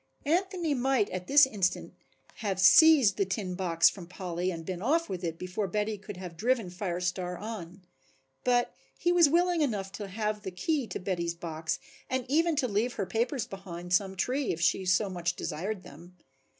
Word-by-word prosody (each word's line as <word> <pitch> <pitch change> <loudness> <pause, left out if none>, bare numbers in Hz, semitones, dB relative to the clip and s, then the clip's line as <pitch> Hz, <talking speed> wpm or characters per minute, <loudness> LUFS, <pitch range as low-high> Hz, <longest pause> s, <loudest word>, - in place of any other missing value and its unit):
Anthony 350 0 0
might 260 -4 +1
at 180 0 -5
this 285 0 +7
instant 200 -8 -1 0.4
have 195 -4 -2
seized 275 - +7
the - - +3
tin 185 -1 -3
box 175 -3 +3
from 180 -4 -2
Polly 180 0 -3
and 165 -3 -5
been 185 0 -4
off 325 +9 +1
with 185 -1 -5
it 165 -1 -3
before 185 +3 -3
Betty 210 +3 -1
could 205 -1 -9
have 180 -2 -8
driven 225 0 0
Fire 180 -1 -3
Star 180 0 -2
on. 190 -4 -7 0.6
But 245 -1 +2 0.2
he 350 - +1
was 345 -4 +6
willing 345 +1 +2
enough 205 -9 -1
to 205 0 -6
have 210 +1 -2
the 195 - -5
key 250 - -1
to - - -5
Betty's 175 -3 -2
box 160 -2 -3 0.3
and 260 -1 -1
even 325 +4 +2
to 275 -3 +1
leave 225 +3 0
her 200 - -2
papers 235 +6 -1
behind 180 -2 -7
some 190 +1 +2
tree 255 +8 0
if 165 - -4
she 180 +2 +2
so 180 +3 +3
much 175 -2 -2
desired 185 +5 -4
them. 175 +5 -14
195 Hz, 190 wpm, -29 LUFS, 180-250 Hz, 0.6 s, this